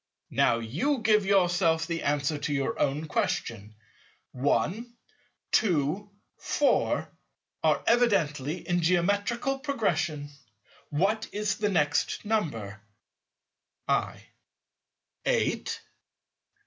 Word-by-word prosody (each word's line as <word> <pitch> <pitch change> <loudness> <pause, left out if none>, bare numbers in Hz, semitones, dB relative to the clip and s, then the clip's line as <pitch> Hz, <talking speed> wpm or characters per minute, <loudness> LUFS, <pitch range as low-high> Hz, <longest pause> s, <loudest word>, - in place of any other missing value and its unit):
Now 115 - +3
you 135 - -1
can 235 - -7
give 210 -2 +3
yourself 175 -4 +3
the 165 0 -3
answer 145 +1 0
to 145 +1 -3
your 135 -2 -1
own 145 +3 0
question: 110 -7 -2 0.6
1, 185 - 0 0.6
2, 180 +1 +1 0.3
4, - - +1 0.6
are - - +2
evidently 170 - +1
in 175 -1 +1
Geometrical 205 +10 +1
Progression. 170 - -1 0.6
What 200 +9 0
is 205 -1 -1
the 210 -1 +1
next 150 0 +1
number? 115 - -2 1.1
I. - - 0 1.0
Eight. - - 0
170 Hz, 95 wpm, -28 LUFS, 145-210 Hz, 1.1 s, Now